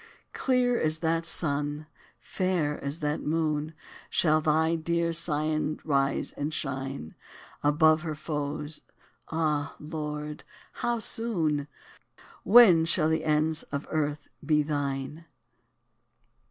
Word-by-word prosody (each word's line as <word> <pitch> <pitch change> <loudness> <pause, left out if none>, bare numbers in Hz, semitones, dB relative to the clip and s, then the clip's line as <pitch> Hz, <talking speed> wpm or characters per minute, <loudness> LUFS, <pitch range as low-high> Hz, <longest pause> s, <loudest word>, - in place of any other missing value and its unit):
Clear 250 -2 +2
as 155 0 +1
that 165 +1 0
sun, 145 -1 -1 0.3
fair 175 -6 -1
as 140 +4 -2
that 150 0 -1
moon, 155 0 -1 0.3
Shall 155 -2 +3
thy 160 +1 +2
dear 170 +1 0
Zion 155 -1 0
rise 140 -2 0
and 145 +2 -4
shine 135 - -4 0.5
Above 155 +2 +4
her 155 -2 -4
foes 150 0 -4 0.5
Ah! 155 -3 0
Lord, 150 -1 -5 0.3
how 240 0 -1
soon? 170 -11 -1 0.8
When 200 -7 +7
shall 160 -1 +3
the 160 0 0
ends 155 +1 +1
of 140 0 -5
earth 150 -1 -1 0.2
be 150 0 +3
thine? 145 +1 -3
155 Hz, 110 wpm, -28 LUFS, 150-165 Hz, 0.8 s, When